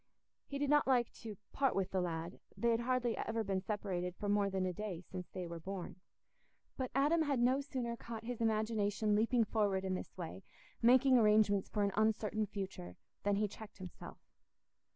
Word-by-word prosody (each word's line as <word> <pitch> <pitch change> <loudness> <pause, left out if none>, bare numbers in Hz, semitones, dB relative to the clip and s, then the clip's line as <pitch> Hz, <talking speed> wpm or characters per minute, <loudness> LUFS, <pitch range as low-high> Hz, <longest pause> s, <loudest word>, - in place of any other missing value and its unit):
He 280 - -4
did 285 0 0
not 295 -2 +4
like 245 -3 +3
"to 215 -3 -7 0.2
part 270 -2 +2
wi' 195 - +3
th' 185 - -13
lad": 170 0 -4 0.2
they 235 0 +2
had 230 - +2
hardly 245 -1 +1
ever 225 0 -1
been 195 -2 -1
separated 185 -3 -3
for 205 - -4
more 205 0 +2
than 190 -1 -1
a 180 - -1
day 200 -2 -4
since 180 -1 -6
they 185 - -5
were 170 0 -6
born. 190 +2 -6 0.8
But 260 -2 -2
Adam 295 +5 +4
had 285 -5 +1
no 255 +3 +3
sooner 255 -4 -3
caught 230 -1 -7
his 240 0 -4
imagination 215 -1 +1
leaping 230 +3 +3
forward 205 -3 +1
in 190 - 0
this 185 - -6
way—making 245 +8 +2
arrangements 210 -2 +4
for 210 - 0
an 200 - +2
uncertain 215 0 +1
future—than 195 - -4
he 210 +1 +1
checked 210 +1 -11
himself. 185 -3 -9
215 Hz, 180 wpm, -36 LUFS, 195-235 Hz, 0.8 s, not